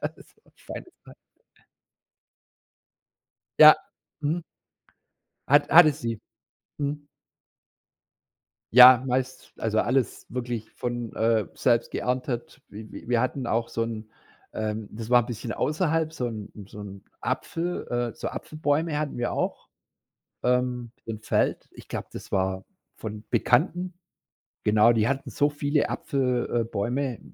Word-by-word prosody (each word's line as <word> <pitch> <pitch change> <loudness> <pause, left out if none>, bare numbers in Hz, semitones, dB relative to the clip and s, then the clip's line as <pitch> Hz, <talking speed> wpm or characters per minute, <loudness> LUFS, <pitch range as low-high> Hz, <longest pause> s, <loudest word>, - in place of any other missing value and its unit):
Das - - -6
war - - -34
was - - -26
feines, 360 - -9
ja. - - -12 2.5
Ja, - - +12 0.5
mhm. 160 +3 -1 1.1
Hat 145 +1 +5
hatte 160 -3 +8
sie. 115 -4 -4 0.6
Mhm. 145 +1 -3 1.7
Ja, 125 0 +10
meist 130 0 -2
also 110 -1 +1
alles 130 -1 0
wirklich 120 -2 -4
von, 120 -2 -4
äh, 110 -2 +2
selbst 120 -2 +2
geerntet. 125 -1 -3
Wi 105 +1 -10
wi - - -10
wir 120 -2 +3
hatten 130 0 -2
auch 115 +1 0
so 115 - -2
'n 110 -1 -5 0.4
ähm, 110 -1 -3
das 115 +2 -7
war 125 -1 +7
'n - - -8
bisschen 115 -1 -5
außerhalb, 160 - 0
so 125 -6 -3
'n 110 -3 -7 0.2
so - - -12
'n 100 -1 -9 0.2
Apfel 175 +2 -3
äh, 120 -2 -1
so - - -4
Apfelbäume 155 0 -1
hatten 150 -4 -3
wir 120 - -1
auch, - - -3 0.7
ähm, 125 -1 0
im 110 -2 -6
Feld. - - 0
Ich - - -14
glaube, - - -5
das - - -9
war 95 0 0 0.3
von 105 0 -7
Bekannten. 175 +9 +2 0.7
Genau, 105 +2 +5
die 115 -1 +2
hatten 135 +1 -2
so 145 - +2
viele 145 0 0
Apfel 125 -3 0
äh, - - -3
Bäume, 120 +4 -2
120 Hz, 135 wpm, -26 LUFS, 110-140 Hz, 2.5 s, Ja